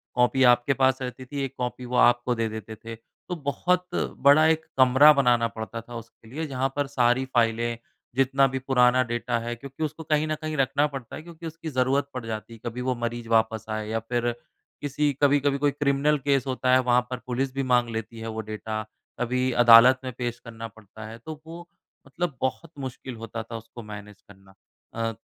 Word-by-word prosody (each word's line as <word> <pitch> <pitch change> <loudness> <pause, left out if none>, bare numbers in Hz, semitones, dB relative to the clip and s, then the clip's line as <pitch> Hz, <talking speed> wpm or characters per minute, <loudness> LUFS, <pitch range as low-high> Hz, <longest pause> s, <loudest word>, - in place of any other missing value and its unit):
Copy 125 +2 +3
आपके 120 +2 +5
पास 130 0 +2
रहती 130 0 -6
थी 140 +1 -4
एक 135 - -4
कॉपी 125 0 -4
वो 125 - -4
आपको 120 0 +4
दे 115 0 0
देते 110 0 -7
थे। 115 - -6
तो 145 +10 -10
बहुत 180 +5 0
बड़ा 145 +3 +4
एक 160 0 +1
कमरा 130 +3 +7
बनाना 120 -4 +3
पड़ता 115 +1 -6
था 120 +1 -11
उसके 115 -1 -11
लिए। 155 +5 -4
जहाँ 135 0 -1
पर 145 -1 0
सारी 130 -1 +2
फाइलें 115 -1 +1 0.4
जितना 135 +1 +3
भी 130 0 -3
पुराना 130 -1 +3
डेटा 120 0 -1
है 120 +1 -4
क्योंकि 135 +5 -7
उसको 155 +1 -4
कहीं 155 0 +1
न 155 - -1
कहीं 155 0 -3
रखना 140 +2 +2
पड़ता 135 -5 -8
है - - -7
क्योंकि 170 -1 -11
उसकी 160 0 -7
ज़रूरत 135 +1 +1
पड़ 125 -2 -5
जाती। 115 +1 -6
कभी 120 +1 -4
वो 130 0 -1
मरीज़ 120 0 -4
वापस 110 -1 +2
आए 110 0 -3
या 115 +1 -1
फ़िर 120 +1 -1 0.5
किसी 145 +1 0
कभी-कभी 145 -1 +3
कोई 145 0 +2
क्रिमिनल 145 +1 +1
केस 140 -2 +1
होता 130 0 0
है 130 - +6
वहाँ 125 0 +3
पर 125 - -3
पुलिस 130 +1 -2
भी 135 0 -1
माँग 125 -2 +2
लेती 115 0 -6
है 115 - -6
वो 110 0 -4
डेटा 110 0 -5 0.4
कभी 125 +1 0
अदालत 120 +2 +8
में 130 - -4
पेश 120 -1 -3
करना 115 -1 -8
पड़ता 110 0 -13
है। 115 +1 -9
तो 155 +5 -9
वो 170 +2 -10 0.4
मतलब 150 0 -3
बहुत 145 +5 -2
मुश्किल 130 -1 -6
होता 115 0 -6
था 115 0 -7
उसको 115 +1 -11
मैनेज 105 -1 -10
करना। 95 -1 -17 0.4
अ, 115 0 -1
125 Hz, 200 wpm, -25 LUFS, 115-140 Hz, 0.5 s, अदालत